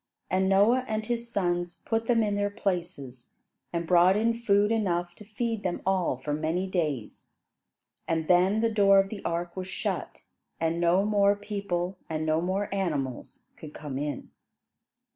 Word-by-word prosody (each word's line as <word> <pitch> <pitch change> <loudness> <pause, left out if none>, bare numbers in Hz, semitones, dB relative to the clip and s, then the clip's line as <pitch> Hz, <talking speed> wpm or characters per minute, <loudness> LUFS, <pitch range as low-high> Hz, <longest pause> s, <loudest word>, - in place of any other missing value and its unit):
And 190 +1 +2
Noah 210 +7 +4
and 215 0 -2
his 235 0 -3
sons 175 -3 -1
put 225 0 -1
them 230 -2 +3
in 205 -1 0
their 205 0 0
places, 175 - -4 0.4
and 170 0 -2
brought 180 +3 +5
in 230 +2 +2
food 210 -2 +2
enough 175 -6 0
to 210 - -13
feed 225 +1 -3
them 180 -3 -2
all 185 -8 +1
for 135 +3 -4
many 160 +5 -1
days. 155 - -3 0.8
And 160 -1 -1
then 185 +4 +4
the 230 0 +2
door 200 -2 +5
of 195 0 +3
the 210 -1 -7
ark 170 +1 -3
was 185 -1 -5
shut 190 - -4 0.4
and 165 +1 0
no 175 +3 +3
more 205 -1 +3
people 195 -3 -3
and 155 -1 -2
no 155 +1 +1
more 190 +3 -1
animals 140 -9 -3
could 150 -1 -11
come 140 -3 -5
in. 145 0 -4
185 Hz, 165 wpm, -27 LUFS, 170-205 Hz, 0.8 s, brought